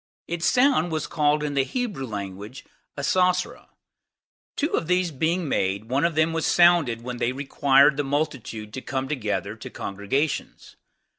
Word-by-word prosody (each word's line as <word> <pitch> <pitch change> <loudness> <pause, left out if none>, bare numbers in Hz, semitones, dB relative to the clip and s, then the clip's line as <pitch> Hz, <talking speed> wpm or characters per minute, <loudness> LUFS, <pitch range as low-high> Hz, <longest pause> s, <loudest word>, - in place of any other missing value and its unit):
Its 170 0 -1
sound 250 - +3
was 155 -1 -2
called 150 -1 +1
in 145 -1 -2
the 135 -1 +2
Hebrew 200 - -4
tongue 100 -2 -5 0.6
Asosra. 180 +5 0 0.9
Two 300 +3 -1
of 160 - -1
these 180 -1 +1
being 160 +4 -1
made, 100 -2 -1
one 135 +5 +1
of 170 -2 0
them 160 +1 +2
was 165 -1 -1
sounded 170 -10 +4
when 125 0 -5
they 120 - 0
required 140 +1 +3
the 145 - 0
multitude 135 -7 -3
to 130 - -5
come 130 +1 -3
together 125 -8 -2
to - - -9
congregations. 100 +10 -3
145 Hz, 155 wpm, -24 LUFS, 125-170 Hz, 0.9 s, sounded